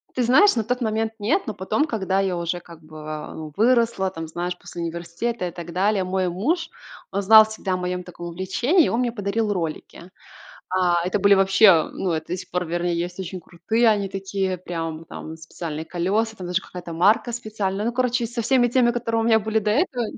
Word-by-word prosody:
Ты 255 - 0
знаешь, 260 - +5
на 225 - 0
тот 250 +4 -1
момент 220 0 -1
нет, 230 - 0
но 215 - -4
потом, 190 +11 0
когда 195 -6 -1
я 190 -3 0
уже 170 +1 -2
как 165 -2 -15
бы 155 0 -7
выросла, 230 -4 +2
там, 165 -2 -6
знаешь, 175 +2 -4
после 170 - -7
университета 170 +5 -3
и - - -6
так 170 -1 -8
далее, 195 +1 +1
мой 185 0 -1
муж, 325 - -1 0.4
он 200 +1 -1
знал 220 +2 +9
всегда 215 -3 -4
о - - 0
моем 180 0 -3
таком 175 -1 -9
увлечении, 190 - +1
и - - 0
он 235 - 0
мне 245 -2 0
подарил 210 0 -1
ролики. 170 0 -5 0.6
А 175 -2 +1
это 185 +3 0
были 200 +1 +5
вообще, 195 -2 +6
ну, 180 -3 -2
это 160 0 -3
до 180 - -2
сих 185 0 -9
пор, 180 0 -1
вернее, 175 +1 -1
есть 175 +2 -4
очень 185 0 -5
крутые, 215 +8 0
они 205 -2 +2
такие 190 -1 -2
прям, 165 -2 -5
там 160 0 -8
специальные 160 -1 -6
колеса, 205 +7 -1
там 185 - -7
даже 180 +1 -1
какая-то 175 -2 -9
марка 210 +8 +3
специальная. 210 -3 -3
Ну, 235 - 0
короче, 245 -1 0
со 235 +1 -4
всеми 245 +1 +3
теми, 240 -1 +3
которые 230 -2 -1
у - - -1
меня 225 -1 +4
были 220 +1 0
до 210 0 -1
этого 260 - 0
190 Hz, 210 wpm, -23 LUFS, 175-225 Hz, 0.6 s, знал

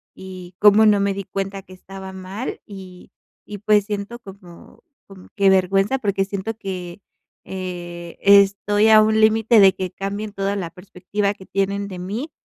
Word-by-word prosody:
y 185 -1 -10
cómo 210 +1 +6
no 210 -1 +4
me 200 0 0
di 200 0 -5
cuenta 195 +1 -5
que 185 - -15
estaba 190 +1 -10
mal, 190 +6 -6
y 190 -3 -12 0.3
y 205 - -8
pues 210 0 +2
siento 205 +3 -5
como 190 -5 -15 0.2
como 195 -2 -15
que 200 -1 +3
vergüenza 195 +5 +2
porque 200 -6 -1
siento 200 +3 -5
que, 185 -3 -7 0.4
eh, 175 -2 -7
estoy 200 +1 +4
a 215 0 +8
un 220 0 +2
límite 220 +1 +4
de 195 -2 +7
que 185 -1 -4
cambien 200 +3 -5
toda 200 0 -2
la 185 -4 -4
perspectiva 195 +2 -4
que 190 -2 -16
tienen 200 +1 -2
de 190 -2 -8
mí 210 - -5
195 Hz, 170 wpm, -21 LUFS, 185-205 Hz, 0.4 s, a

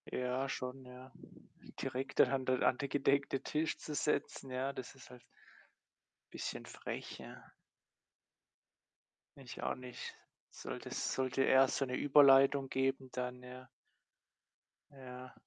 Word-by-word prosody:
Ja, 125 +2 -1
schon, 130 +1 -4
ja. 125 +1 -12 0.7
Direkt 130 +2 -4
da - - +10
an 130 -1 0
den 130 -1 +1
an 125 - +4
den 140 - -2
gedeckten 140 0 +1
Tisch 155 +1 -1
zu 150 - -7
setzen, 145 -2 -1
ja, 130 +2 -2
das 130 -1 -8
ist 135 - -14
halt 125 -1 -12 1.1
bisschen - - -5
frech, - - -6
ja. - - -12 1.9
Ich 135 -3 -9
auch - - 0
nicht. 125 -1 -8 0.4
Sollte - - -7
s - - -2
sollte 130 0 +1
erst 130 0 +5
so 135 - +1
'ne 125 -1 -3
Überleitung 135 -1 +6
geben, 135 0 0
dann 125 0 -4
ja. 125 0 -10 1.2
Ja. 130 -2 -10
130 Hz, 130 wpm, -35 LUFS, 125-135 Hz, 1.9 s, da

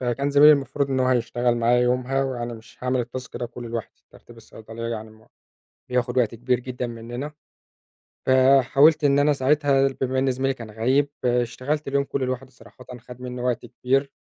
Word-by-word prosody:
فكان 130 +3 -1
زميلي 145 +2 +8
المفروض 140 0 -1
إن 130 -1 0
هو 130 - +2
هيشتغل 120 -1 +1
معايا 120 +1 +3
يومها، 125 +2 +1
وأنا 120 -3 -4
مش 110 0 -15
هاعمل 125 -1 0
الtask 125 +1 -8
ده 120 - -3
كله 120 0 -9
لوحدي. 115 -2 -7
ترتيب - - -17
الصيدلية 115 +1 -9
يعني 110 -1 -5
م 110 0 -20 0.6
بياخد 125 0 0
وقت 115 -3 +1
كبير 125 +1 0
جدًا 125 0 -5
مننا، 120 +5 -7 0.9
فحاولت 135 +4 +5
إن 140 0 +4
أنا 145 +1 +3
ساعتها 140 0 +2
بما 130 0 0
إن 135 0 +2
زميلي 135 +1 -1
كان 115 -4 -10
غايب، 130 +6 +1 0.2
اشتغلت 125 +5 -1
اليوم 140 0 +1
كله 140 -1 -3
لوحدي، 130 +1 -4
صراحةً 125 +1 -17
خَد 125 +1 -13
مني 125 -1 -6
وقت 125 -1 -1
كبير. 135 +3 -1
125 Hz, 175 wpm, -23 LUFS, 120-135 Hz, 0.9 s, زميلي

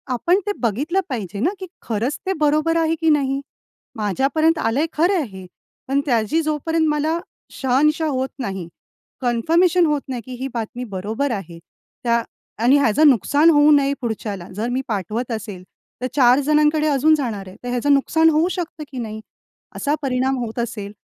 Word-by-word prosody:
आपण 350 +10 +2
ते - - +2
बघितलं 285 - 0
पाहिजे 205 -6 -4
ना, 295 - +2
की 375 - -6
खरंच 235 +5 -2
ते 385 - 0
बरोबर 305 +2 +2
आहे 325 0 +1
की 325 - +3
नाही? 275 -2 +2 0.6
माझ्यापर्यंत 275 - +1
आलंय 260 +7 +1
खरं 345 +6 +2
आहे 330 -6 0
हे, 185 - -9 0.4
पण 275 +1 +1
त्याची 240 +3 +1
जोपर्यंत 315 +1 0
मला 300 +2 0 0.3
शहानिशा 295 +5 +1
होत 265 -2 -1
नाही, 195 -8 -4 0.5
कन्फर्मेशन 330 +9 +3
होत 295 -2 +1
नाही, 245 -2 -3
की 255 - -8
ही 270 - -1
बातमी 240 +1 -4
बरोबर 220 +9 -2
आहे, 170 -4 -8 0.4
त्या 235 -1 +2 0.4
आणि 260 +4 +6
ह्याचं 280 +4 +4
नुकसान 285 - +4
होऊ 295 -1 +5
नये 280 -1 +4
पुढच्याला. 210 -6 -4
जर 220 +4 -2
मी 255 +2 -1
पाठवत 220 +4 -3
असेल, 205 -5 -5 0.4
तर 255 - -1
4 255 -2 +5
जणांकडे 300 +1 +2
अजून 300 +2 +4
जाणार 220 -9 -4
आहे. 185 - -11
तर 245 - -4
ह्याचं 250 +4 +2
नुकसान 320 +4 +3
होऊ 320 +2 +2
शकतं 340 -3 -5
की 260 - -8
नाही? 220 -1 -5 0.5
असा 290 +1 0
परिणाम 265 -1 0
होत 225 +1 -6
असेल 215 -4 -4
270 Hz, 170 wpm, -21 LUFS, 230-310 Hz, 0.6 s, आणि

